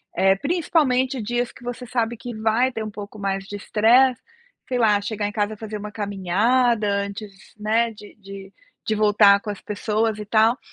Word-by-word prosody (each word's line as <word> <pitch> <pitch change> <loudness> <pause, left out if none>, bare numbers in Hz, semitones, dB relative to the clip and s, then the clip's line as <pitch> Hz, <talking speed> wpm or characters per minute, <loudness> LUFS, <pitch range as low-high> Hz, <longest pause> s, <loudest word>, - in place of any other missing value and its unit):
eh, 190 +1 +4
principalmente 275 - +1
dias 240 +2 -2
que - - -16
você 245 +1 -6
sabe 235 -1 -1
que 245 +2 -7
vai 225 +4 +1
ter 220 -2 -4
um 215 - -6
pouco 205 +1 -9
mais 195 -1 -2
de 205 - -7
estresse, 235 +5 +3 0.5
sei 255 - -1
lá, 210 -3 +3
chegar 205 0 -3
em - - -5
casa 210 0 -1
e 215 - -11
fazer 215 -1 -6
uma 210 +1 -7
caminhada 210 +4 +1
antes, 200 +1 -3 0.3
né, 225 +2 +1
de 210 -1 -14
de 195 -1 -11 0.3
de 215 - -1
voltar 205 -1 +5
com 210 - -4
as 205 - -9
pessoas 215 +1 -1
e 210 - -7
tal, 220 +4 +3
215 Hz, 190 wpm, -22 LUFS, 205-240 Hz, 0.5 s, voltar